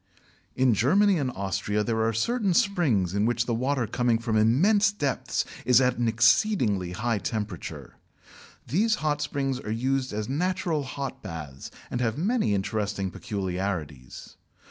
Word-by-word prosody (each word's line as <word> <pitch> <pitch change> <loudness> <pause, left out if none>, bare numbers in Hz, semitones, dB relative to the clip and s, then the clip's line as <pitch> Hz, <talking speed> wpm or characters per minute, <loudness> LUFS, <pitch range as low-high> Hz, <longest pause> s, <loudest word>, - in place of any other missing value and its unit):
In 130 -2 +3
Germany 185 - +3
and 135 -3 -1
Austria 100 0 -2
there 110 0 -1
are 115 0 +2
certain 200 - 0
springs 155 - +2
in 100 +2 +1
which 120 -1 0
the 120 - -1
water 130 +2 0
coming 120 +1 +1
from 115 -1 -2
immense 190 - +4
depths 145 -10 -2 0.2
is 125 0 +5
at 125 -2 +1
an 120 - +1
exceedingly 110 - +2
high 110 +2 -1
temperature. 105 - -5 0.7
These 215 - +2
hot 150 -1 +1
springs 135 -3 -2
are 110 - -7
used 130 +4 -1
as 105 0 -3
natural 170 +2 -1
hot 135 0 -5
baths, 75 -8 -8 0.2
and 125 - -2
have 115 0 0
many 200 - +1
interesting 100 -1 -2
peculiarities. 90 - -5
120 Hz, 145 wpm, -26 LUFS, 105-145 Hz, 0.7 s, is